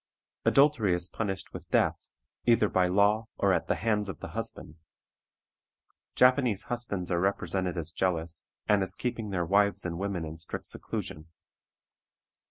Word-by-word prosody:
Adultery 135 -10 +4
is 90 0 +2
punished 95 -1 -4
with - - -9
death, - - +1 0.4
either 115 -3 +5
by 90 -1 +3
law 100 +4 +3
or - - +3
at - - 0
the - - +1
hands 105 -2 0
of 85 - -6
the - - -7
husband. 75 - -6 1.4
Japanese 125 -5 +4
husbands 110 -8 -3
are 85 - +2
represented 95 -2 0
as 80 -1 -2
jealous, 85 -2 -2 0.2
and 105 -1 +4
as 95 -1 -2
keeping 115 -3 -3
their 90 -3 -1
wives 100 +2 +2
and 85 -1 -3
women 95 -4 -2
in 80 +1 -7
strict 80 - -6
seclusion. 75 +2 -4
95 Hz, 150 wpm, -29 LUFS, 90-105 Hz, 1.4 s, either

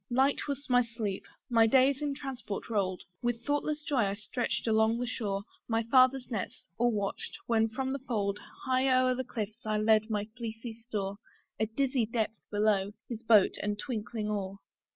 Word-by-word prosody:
Light 265 +5 +2
was 280 0 -4
my 245 -2 +5
sleep; 230 -5 -3 0.2
my 230 -3 +5
days 265 +3 +4
in 290 -2 -1
transport 255 -6 -5
roll'd: 185 -4 0 0.2
With 240 -1 -1
thoughtless 295 +1 0
joy 290 -2 -1
I 195 0 -1
stretch'd 230 +3 -2
along 220 +1 +3
the 245 - -1
shore 205 -5 -2 0.2
My 225 0 +1
father's 255 +2 +4
nets, 215 -5 -4
or 240 0 +4
watched, 205 -3 -3
when 225 -1 +3
from 265 +3 -2
the 275 - -2
fold 210 -6 -1 0.3
High 260 0 +3
o'er 255 0 +4
the 260 +1 -2
cliffs 220 -1 -5
I 215 -1 0
led 215 +1 +4
my 210 -1 0
fleecy 230 -1 -5
store, 210 -4 -4 0.4
A 220 - +2
dizzy 255 0 +1
depth 225 -1 -2
below! 205 -1 +2 0.2
his 230 -2 -5
boat 220 -4 +5
and 205 0 -1
twinkling 215 -1 -3
oar. 200 -2 -2
230 Hz, 175 wpm, -31 LUFS, 210-255 Hz, 0.4 s, my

